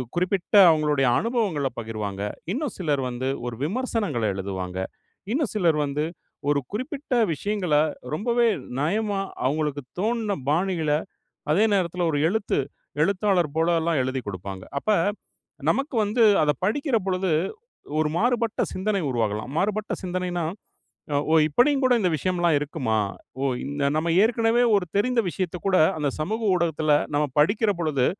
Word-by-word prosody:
குறிப்பிட்ட 180 +1 -1 0.2
அவங்களுடைய 150 -4 +2
அனுபவங்களை 210 - 0
பகிர்வாங்க. 105 -3 -4 0.3
இன்னும் 265 +3 -2
சிலர் 150 -7 0
வந்து 125 +1 -3 0.2
ஒரு 120 - -4
விமர்சனங்களை 205 - -1
எழுதுவாங்க. 95 -1 -4 0.5
இன்னும் 275 -1 0
சிலர் 170 -6 +3
வந்து 145 +2 -2 0.5
ஒரு 145 - +3
குறிப்பிட்ட 260 +5 -4 0.2
விஷயங்கள 195 0 -2 0.4
ரொம்பவே 235 +7 +2 0.3
நயமா 200 +6 0 0.3
அவங்களுக்குத் 145 -1 -1
தோணுன 220 0 0 0.2
பாணிள, 170 -1 +1 0.6
அதே 195 +8 +4
நேரத்தில 180 -2 0
ஒரு 145 - +1
எழுத்து 205 +2 0 0.4
எழுத்தாளர் 185 -4 +1
போல 165 +1 +3
எல்லாம் 165 -3 +1
எழுதிக் 130 -2 -3
குடுப்பாங்க. 95 0 -6 0.2
அப்ப 215 - -2 0.8
நமக்கு 275 +1 -1
வந்து 215 +4 +1 0.2
அதை 150 -1 +3
படிக்கிற 270 - +1
பொழுது, 185 -1 0 0.7
ஒரு 155 -1 +2
மாறுபட்ட 235 0 +1
சிந்தனை 200 +1 -1
உருவாகலாம். 110 -1 -1
மாறுபட்ட 210 +4 0
சிந்தனைனா, 180 -2 -2 0.9
ஓ! - - +6
இப்படியும் 270 - +3
கூட 255 - +4
இந்த 185 -4 +2
விஷயம் 180 +4 -1
எல்லாம் 170 -3 +3
இருக்குமா? 140 -7 -1 0.4
ஓ - - 0 0.5
நாம் 165 +2 0
ஏற்கனவே 230 +1 +3
ஒரு 195 - +1
தெரிந்த 245 +4 +2
விஷயத்தைக் 180 0 -4
கூட, 190 -1 +3 0.2
அந்த 150 -2 0
சமூக 215 +9 -2
ஊடகத்தில 160 -3 +1 0.2
நாம் 145 -2 0
படிக்கிற 205 +7 +3
பொழுது 145 -6 +1
175 Hz, 130 wpm, -25 LUFS, 145-215 Hz, 0.9 s, ஓ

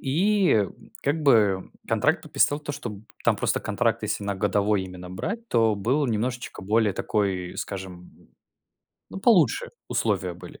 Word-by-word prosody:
и, 175 - +3 0.4
как 145 +3 0
бы, 105 -9 +3 0.2
контракт - - +2
подписал 145 - +2
то 150 -1 -5
что 125 - -5
б 105 -1 -9 0.2
там - - +3
просто - - 0
контракт - - 0
если 100 - -2
на 100 -1 -1
годовой 105 0 +1
именно 90 -1 -9
брать, 225 - -4
то 115 -2 +3
было 130 +8 +1
немножечко 120 -1 -3
более 105 0 +2
такой 95 -4 -1
скажем, 90 -2 -6 1.0
ну 195 - -7
получше 230 - +4 0.2
условия - - 0
были. - - -12
110 Hz, 145 wpm, -25 LUFS, 95-145 Hz, 1.0 s, получше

